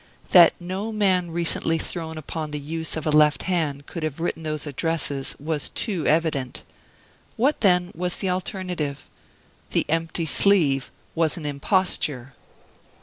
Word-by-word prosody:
That 175 -3 +8
no 190 +5 -4
man 190 -5 +1
recently 165 -1 +1
thrown 160 0 -5
upon 155 0 -5
the 150 0 -4
use 160 +3 -3
of 160 - -5
a 155 - +1
left 150 -1 +4
hand 155 -6 -1
could 170 - -7
have 155 -2 -3
written 165 -1 -2
those 155 -1 -3
addresses 145 -2 -1
was 150 -1 -2
too 195 -8 -1
evident. 150 -5 0 0.7
What, 275 +6 +1
then, 180 -3 +3
was 180 +1 -3
the 190 - -2
alternative? 180 -6 -3 0.6
The - - +1
empty 165 +1 -1
sleeve 155 -6 +3 0.2
was 165 -1 +1
an 160 - -7
imposture! 145 - 0
165 Hz, 145 wpm, -24 LUFS, 150-180 Hz, 0.7 s, That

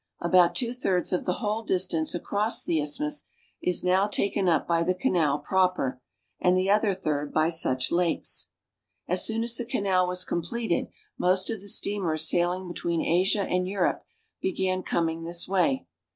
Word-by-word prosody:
About 175 0 +4
two 235 +6 -1
thirds 190 -9 -1
of 180 - -1
the 180 - +1
whole 210 +2 0
dis 190 -4 +1
tance 160 -2 -1
across 205 +5 0
the 160 -3 0
isthmus 295 - -1 0.4
is 180 - +1
now 185 +2 +3
taken 200 -2 0
up 160 -3 +1
by 170 -1 +2
the 180 +2 +1
canal 165 -5 +1
proper, 180 -5 0 0.4
and 180 0 +3
the 190 +1 +2
other 210 0 +3
third 150 -6 -2
by 155 +1 +2
such 130 -6 0
lakes. 170 - 0 0.6
As 180 +1 +3
soon 225 +1 +1
as 235 0 +1
the 245 - -1
canal 195 -5 +1
was 180 0 -1
eompleted, 175 +3 -2 0.3
most 185 +3 +1
of 220 -4 -4
the 200 - -7
steam 200 0 +1
ers 155 0 +1
sailing 175 +2 0
between 170 -1 -2
Asia 185 +4 +2
and 180 -1 -1
Europe 190 -1 0 0.4
began 185 0 -1
coming 165 -2 -1
this 170 +1 -4
way. 195 +8 +1
180 Hz, 175 wpm, -27 LUFS, 170-200 Hz, 0.6 s, About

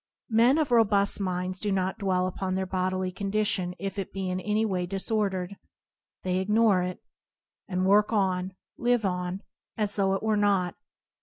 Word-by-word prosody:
Men 235 +6 +5
of 305 -5 0
robust 205 -4 +3
minds 185 0 -2
do 210 - -1
not 190 -1 -1
dwell 185 -2 +1
upon 185 0 -2
their 190 0 -1
bodily 185 0 -1
condition 195 -2 0
if 195 +2 -4
it 195 - -4
be 190 -1 -3
in 185 - -2
any 210 +3 0
way 180 -4 -1
disordered 195 -1 -1 0.3
— - - -63
they 185 0 0
ignore 210 0 +3
it, 180 0 -4 0.6
and 185 -1 -1
work 205 +3 +4
on, 185 -3 0 0.2
live 240 -2 +2
on, 180 +1 -2 0.3
as 210 -2 0
though 195 -1 +2
it 195 - -4
were 220 -1 +2
not. 195 -4 +2
195 Hz, 170 wpm, -27 LUFS, 185-210 Hz, 0.6 s, Men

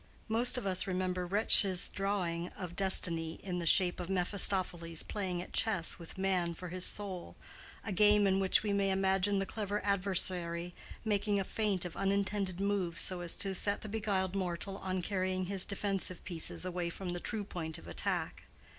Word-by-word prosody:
Most 235 +3 +1
of 245 - -4
us 190 -1 +2
remember 185 -1 -2
Retzsch's 195 -1 +5
drawing 180 -4 -2
of 180 -2 -6
destiny 165 -4 +2
in 180 -2 -3
the 170 - -3
shape 180 +1 +4
of 180 - -5
Mephistopheles 180 -3 +1
playing 185 -4 -3
at - - -14
chess 195 -8 +2
with 170 +2 -10
man 185 -3 0
for 180 +1 -8
his 185 +1 +1
soul, 190 -4 -3 0.5
a 205 - -3
game 210 +2 +5
in 195 0 +2
which 190 +1 +3
we 205 -2 -1
may 200 -1 +1
imagine 195 +1 +1
the 195 - 0
clever 205 0 -3
adversary 180 -3 0 0.3
making 205 -1 +1
a - - 0
feint 200 -3 -1
of 175 - -7
unintended 195 -1 -1
moves 195 -4 -1
so 185 -2 0
as 175 -1 -2
to 195 -1 -2
set 200 +2 -1
the 215 - -7
beguiled 200 -3 -1
mortal 190 +1 -3
on 185 -1 -3
carrying 185 -1 -1
his 190 0 +2
defensive 195 -3 0
pieces 175 0 -1
away 175 -1 -3
from 180 +2 -6
the 175 - -4
true 215 +3 -2
point 165 -5 -6
of - - -13
attack. 85 - -3
190 Hz, 180 wpm, -32 LUFS, 175-200 Hz, 0.5 s, Retzsch's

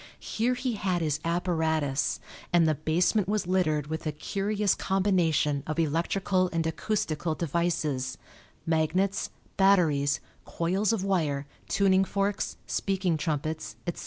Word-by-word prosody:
Here 240 +3 0
he 250 0 -2
had 185 -4 0
his 150 -2 0
apparatus, 160 -5 0 0.3
and 170 -2 +5
the 155 - +3
basement 175 +6 +1
was 210 -2 0
littered 165 -5 +1
with 160 +1 -4
a - - +1
curious 200 +6 0
combination 170 -7 +1
of 155 - -2
electrical 180 +4 +1
and 165 -1 0
acoustical 160 -2 -1
devices 155 -5 -1 0.5
magnets, 165 +5 +1 0.3
batteries, 165 -8 +4 0.2
coils 190 +6 0
of 220 -4 0
wire, 155 -8 0 0.2
tuning 195 -1 +3
forks, 200 +1 -1
speaking 190 -3 0
trumpets, 155 0 -3
etc. 175 - -3
170 Hz, 125 wpm, -28 LUFS, 155-195 Hz, 0.5 s, and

